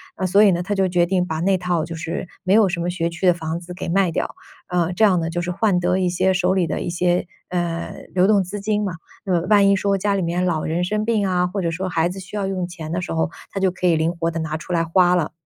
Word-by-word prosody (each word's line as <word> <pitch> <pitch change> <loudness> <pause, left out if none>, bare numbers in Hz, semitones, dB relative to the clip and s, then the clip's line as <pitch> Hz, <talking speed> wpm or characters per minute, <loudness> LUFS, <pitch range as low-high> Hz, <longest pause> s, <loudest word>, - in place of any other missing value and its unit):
啊， 190 - -2
所 195 +3 +4
以 205 - +6
呢， 175 0 0
他 205 +3 -2
就 190 -1 +2
决 175 -1 +2
定 180 0 +1
把 160 -1 -3
那 190 +2 +2
套 175 -2 -1
就 165 - -7
是 165 +3 -4 0.2
没 185 0 +2
有 210 -2 +5
什 175 -1 -2
么 170 +1 -1
学 170 -1 -1
区 170 +2 -4
的 180 - +6
房 165 -1 -4
子 180 +1 -9
给 180 - -5
卖 185 0 +2
掉。 - - -3 0.3
呃， 175 -1 0
这 220 - +1
样 190 -4 +5
呢， 165 0 -2
就 175 +1 -2
是 175 - -4
换 185 0 +1
得 180 +1 +1
一 180 -1 +1
些 185 +2 +2
手 180 0 +2
里 185 -3 +1
的 150 - -2
一 - - -3
些， 175 +1 +1 0.2
呃， 175 -2 -3
流 185 +1 +4
动 205 -2 +4
资 195 +3 -6
金 210 0 0
嘛。 195 -4 -2 0.3
呃， 180 -3 +1
万 205 -2 +6
一 200 - +5
说 200 0 +1
家 200 +1 0
里 195 - 0
面 175 +1 0
老 165 -4 0
人 165 +3 -1
生 210 +4 -1
病 215 -3 +1
啊， 180 -1 +1
或 195 +2 -3
者 170 - -1
说 185 +3 -3
孩 165 -1 +1
子 190 - -7
需 190 +2 -9
要 200 - -1
用 185 -2 -2
钱 165 -3 -8
的 175 +1 -1
时 - - -5
候， 160 0 0 0.2
他 195 - -3
就 190 -1 +2
可 180 0 -1
以 170 - +4
灵 160 +2 +1
活 165 0 0
地 165 - -4
拿 155 -1 -3
出 165 - -9
来 165 - +2
花 175 +2 +3
了。 170 -4 0
180 Hz, 320 characters per minute, -21 LUFS, 170-190 Hz, 0.3 s, 以